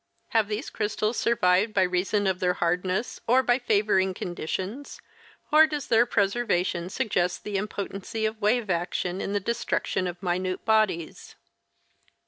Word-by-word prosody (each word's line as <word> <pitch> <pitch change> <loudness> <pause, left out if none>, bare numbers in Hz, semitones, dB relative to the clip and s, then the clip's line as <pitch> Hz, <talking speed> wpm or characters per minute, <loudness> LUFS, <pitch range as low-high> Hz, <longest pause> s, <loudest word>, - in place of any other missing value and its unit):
Have 220 -2 +2
these 215 +6 -4
crystals 215 +1 -1
survived 210 -1 +2
by 190 - +4
reason 185 +3 0
of 190 -1 0
their 180 -1 +1
hardness 180 +5 -1
or 255 +3 +4
by 245 0 +2
favoring 205 -5 +2
conditions, 190 - -5 0.5
or 310 +1 +7
does 295 -3 -5
their 235 +1 +4
preservation 195 -5 0
suggest 180 -6 -1
the 210 - -5
impotency 205 +1 -4
of 220 0 -3
wave 215 0 +1
action 175 +1 -2
in 200 - -3
the 205 - +1
destruction 200 -3 -1
of 175 +1 -7
minute 185 +1 -2
bodies 215 -7 0
200 Hz, 140 wpm, -26 LUFS, 180-225 Hz, 0.5 s, or